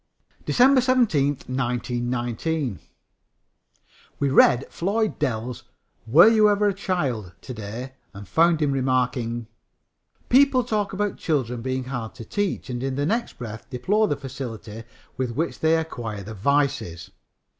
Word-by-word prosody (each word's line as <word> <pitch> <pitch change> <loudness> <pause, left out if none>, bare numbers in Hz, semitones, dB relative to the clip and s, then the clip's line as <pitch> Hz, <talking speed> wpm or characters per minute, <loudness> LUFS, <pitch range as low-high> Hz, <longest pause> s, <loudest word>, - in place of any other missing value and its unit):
DECEMBER 260 +1 +5
17, 240 - +3 0.2
1919. 120 - -2 1.4
We 140 - +1
read 130 -1 +5
Floyd 210 +4 -1
Dell's 125 -4 -3 0.4
Were 155 - +8
You 215 -2 +5
Ever 205 0 +3
a - - -1
Child? 140 - -2
to 130 - -7
day 115 +4 -7 0.2
and 100 0 -10
found 165 - +3
him 145 - +1
remarking: 125 -3 0 0.8
"People 260 0 +5
talk 210 -3 -1
about 205 +1 -2
children 125 -7 -1
being 130 +1 -2
hard 120 -4 -5
to 115 - -9
teach 205 - -2
and 120 -2 -4
in 135 0 -2
the 145 +1 0
next 230 +8 -1
breath 110 -3 -8
deplore 195 - +1
the 145 - -1
facility 115 -5 -7 0.3
with 125 -2 -2
which 165 +5 -2
they 160 +1 +3
acquire 115 -10 -5
the 110 +3 -8
'vices.' 140 - 0
135 Hz, 135 wpm, -24 LUFS, 120-175 Hz, 1.4 s, Were